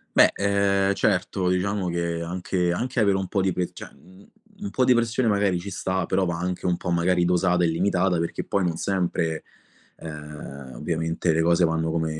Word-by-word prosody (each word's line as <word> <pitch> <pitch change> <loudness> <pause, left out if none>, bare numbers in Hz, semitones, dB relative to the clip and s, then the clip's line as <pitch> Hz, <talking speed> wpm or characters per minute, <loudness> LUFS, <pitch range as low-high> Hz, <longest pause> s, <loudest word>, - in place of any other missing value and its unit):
Beh, - - +6
ehm, 100 -1 +2
certo 95 -2 0
diciamo 95 +1 0
che 85 -1 -2
anche 90 +1 -1
anche 125 +7 -2
avere 100 -3 +3
un 95 -1 -2
po' 100 - 0
di 95 -1 +1
pe 90 0 -1
cioè - - -10
u 95 +2 -18 0.4
un 205 - -3
po' 130 - +1
di 125 - +5
pressione 120 +1 +1
magari 100 -3 +2
ci 100 +3 -7
sta, 95 -1 -1
però 95 +2 +1
va 85 -2 -2
anche 90 +1 -3
un 90 -1 +1
po' 90 - -4
magari 85 +1 +2
dosata 90 0 +2
e - - +4
limitata, 90 +1 +1
perché 85 - -3
poi 100 - 0
non 85 -2 0
sempre, 85 -5 -1 0.5
ehm, 75 -4 -9
ovviamente 80 +1 -1
le 80 - +2
cose 85 +1 +3
vanno 80 0 0
come 80 -1 -2
90 Hz, 195 wpm, -24 LUFS, 85-95 Hz, 0.5 s, Beh